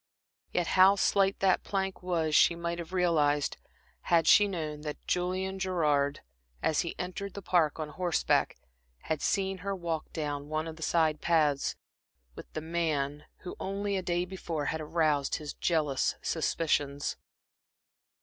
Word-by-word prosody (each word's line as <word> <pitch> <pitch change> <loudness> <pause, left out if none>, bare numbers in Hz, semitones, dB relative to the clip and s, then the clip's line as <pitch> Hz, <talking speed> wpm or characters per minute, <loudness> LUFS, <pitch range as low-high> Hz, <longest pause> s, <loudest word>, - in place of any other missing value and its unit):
Yet 175 - +1
how 190 +3 +6
slight 195 0 +2
that 190 -1 +3
plank 195 -1 -2
was 165 -4 -1
she 170 - +5
might 170 0 -3
have 170 0 -7
realized, 150 -6 +2 0.5
had 165 -2 +4
she 205 +6 +7
known 155 -6 -4
that 150 -1 -6
Julian 185 +2 -1
Gerard, 150 -7 +1 0.4
as 155 - +2
he 170 - -2
entered 185 +2 -5
the 200 - -5
Park 165 -4 +2
on 155 -1 -3
horseback, 175 +1 +1 0.4
had 155 -3 -2
seen 190 -1 0
her 195 +2 -3
walk 170 -3 -4
down 145 -2 -4
one 155 +1 -1
of 160 - -6
the 160 - -14
side 160 -1 +1
paths, 150 -4 +2 0.6
with - - -11
the 155 - -3
man 150 -3 -1 0.2
who, 180 - -7
only 200 +1 -2
a 190 - 0
day 175 0 0
before, 170 -5 -4
had 160 - -3
aroused 155 -3 +1
his 150 -1 -5
jealous 150 -6 0
suspicions. 145 -3 0
165 Hz, 150 wpm, -30 LUFS, 150-185 Hz, 0.6 s, she